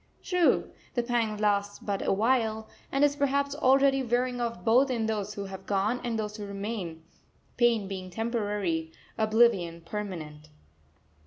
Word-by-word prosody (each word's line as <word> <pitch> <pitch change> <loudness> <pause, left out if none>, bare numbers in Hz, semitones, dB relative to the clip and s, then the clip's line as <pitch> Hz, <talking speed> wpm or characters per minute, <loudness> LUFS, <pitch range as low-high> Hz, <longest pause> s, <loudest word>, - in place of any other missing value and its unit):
True, 360 -3 +2 0.2
the 240 - +1
pang 235 -3 0
lasts 205 -1 +1
but 200 -2 -3
a - - 0
while, 220 0 +1 0.2
and 275 +1 +2
is 285 -1 +4
perhaps 280 0 +1
already 270 -1 +4
wearing 245 0 0
off 230 -6 -3
both 255 +5 +5
in 235 -3 0
those 210 -1 -2
who 200 - -4
have 190 0 -9
gone 205 +5 0
and 235 -2 -1
those 210 -1 -4
who 210 - -5
remain, 200 -5 -5 0.5
pain 235 -4 +3
being 185 -1 -6
temporary, 205 -6 -2 0.2
oblivion 215 -7 +3
permanent. 165 -6 -6
220 Hz, 150 wpm, -28 LUFS, 195-245 Hz, 0.5 s, both